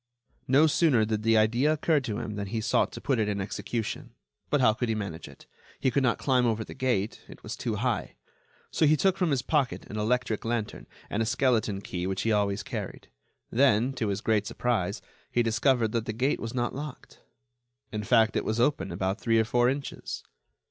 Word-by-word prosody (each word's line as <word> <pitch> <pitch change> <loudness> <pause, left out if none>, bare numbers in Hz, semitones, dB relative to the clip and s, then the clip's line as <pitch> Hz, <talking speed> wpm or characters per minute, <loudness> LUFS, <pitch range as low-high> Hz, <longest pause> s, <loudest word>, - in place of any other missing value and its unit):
No 140 +4 +5
sooner 145 -7 +3
did 105 -1 -1
the 115 0 +3
idea 120 +7 +3
occur 155 0 +2
to 110 -6 -4
him 110 -2 -4
than 100 -1 -4
he 110 +3 -2
sought 115 +3 +1
to - - -6
put 135 -4 0
it 105 -1 +1
in 100 -1 -2
execution. 110 +3 -4 0.3
But 145 - +2
how 125 -4 +5
could 120 +2 -2
he 110 - +1
manage 95 -6 -5
it? - - -15 0.3
He 130 - +1
could 140 - +2
not 130 -3 +2
climb 125 -3 +2
over 110 -1 0
the - - -10
gate; 115 -5 -1
it - - -13
was - - -5
too - - -3
high. - - -2 0.6
So 155 - +3
he 155 +1 +4
took 190 +4 +3
from 180 -3 0
his 135 -3 0
pocket 140 -2 0
an 105 - -4
electric 115 0 0
lantern 115 -2 -3 0.2
and 105 - -2
a - - +1
skeleton 110 -6 +1
key 90 -2 -4
which 95 0 -2
he 115 - +1
always 100 -1 +1
carried. - - -6 0.4
Then, 125 0 +3
to 120 -4 -2
his 100 0 -2
great 105 -2 +1
surprise, 115 -8 -1 0.3
he 120 - +2
discovered 115 0 +2
that 115 -1 -2
the 110 - -2
gate 130 +6 0
was 115 +2 -5
not 120 -1 -1
locked; 145 0 -8 0.7
in 105 -1 -3
fact, 110 0 +3
it - - +1
was 110 +2 -1
open 140 +4 +1
about 95 +4 -2
three 115 -1 +2
or 110 - +3
four 120 +2 +3
inches. 140 +1 -5
115 Hz, 210 wpm, -28 LUFS, 105-130 Hz, 0.7 s, No